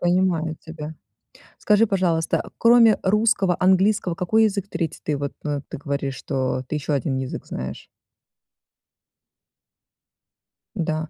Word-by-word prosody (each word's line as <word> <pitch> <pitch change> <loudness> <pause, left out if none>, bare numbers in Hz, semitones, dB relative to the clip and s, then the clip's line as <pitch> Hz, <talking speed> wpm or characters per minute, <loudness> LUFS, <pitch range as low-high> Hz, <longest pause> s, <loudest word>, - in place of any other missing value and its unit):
Понимаю 175 -3 +1
тебя. 160 -1 -8 0.6
Скажи, 210 +1 +3
пожалуйста, 175 -5 0
кроме 230 -1 +6
русского, 200 -3 +2
английского 190 0 +3
какой 210 +5 +2
язык 200 -2 -1
3? 170 -3 -3
Ты 150 -2 -1
вот, 140 0 -4
ну, 145 -2 -2
ты - - -7
говоришь, 140 -1 -3
что 130 -2 -2
ты - - -3
ещё 150 0 -2
1 135 0 -1
язык 130 -1 -4
знаешь. 65 0 -6 2.9
Н-да. 155 -1 -2
170 Hz, 120 wpm, -23 LUFS, 145-195 Hz, 2.9 s, кроме